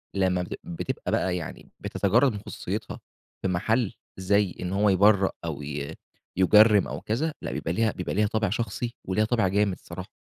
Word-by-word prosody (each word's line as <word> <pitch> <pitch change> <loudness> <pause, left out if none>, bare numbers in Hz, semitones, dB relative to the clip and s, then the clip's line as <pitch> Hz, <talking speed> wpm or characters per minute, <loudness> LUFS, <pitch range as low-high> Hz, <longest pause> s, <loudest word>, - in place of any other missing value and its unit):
لمّا 95 -2 +2
بتبق - - -6
بتبقى 85 - -4
بقى 90 -1 +1
يعني 80 - -8
بتتجرد 140 -2 +2
من 105 - -5
خصوصيتها - - -5 0.4
في 95 - 0
محل 110 +5 +1 0.2
زي 95 0 +1
إن 90 +1 -3
هو 105 +1 +3
يبرأ 100 0 +4
أو 75 -3 -4
ي 75 +2 -5 0.4
يجرّم 105 +2 +6
أو - - -5
كذا 150 +9 -1
لأ، - - -4
بيبقى 80 - -2
ليها 110 +2 +2
بيبقى 90 - -4
ليها 105 +1 +3
طابع 110 -2 0
شخصي 115 +3 -3
وليها 105 +3 +1
طابع 110 -4 +2
جامد 100 +1 +2
الصراحة. 90 +2 -9
100 Hz, 175 wpm, -26 LUFS, 90-110 Hz, 0.4 s, يجرّم